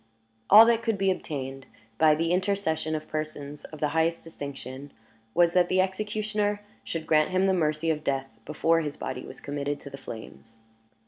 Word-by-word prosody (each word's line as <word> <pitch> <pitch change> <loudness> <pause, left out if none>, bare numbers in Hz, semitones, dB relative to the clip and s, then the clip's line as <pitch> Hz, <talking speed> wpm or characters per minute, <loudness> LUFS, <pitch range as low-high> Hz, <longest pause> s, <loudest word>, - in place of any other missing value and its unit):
All 215 +3 +10
that 230 -1 +3
could 225 -3 0
be 195 0 +2
obtained, 135 -6 -5 0.3
by 155 -1 +6
the 165 +2 0
intercession 180 -4 0
of 155 - -5
persons 150 -2 -5
of 155 - -10
the 150 - +1
highest 160 +2 +1
distinction, 140 -3 -8 0.4
was, 175 -1 +4
that 180 -1 +4
the 185 - +2
executioner 210 +2 -1 0.2
should 165 -1 -4
grant 155 -1 +3
him 185 +1 +2
the 190 - +3
mercy 160 -2 +1
of 155 -1 -3
death 135 -5 -2
before 165 +3 +2
his 150 -2 -4
body 130 0 -5
was - - -10
committed 145 0 -3
to 140 - -10
the 135 - -8
flames. 115 -2 -10
160 Hz, 180 wpm, -27 LUFS, 145-185 Hz, 0.4 s, All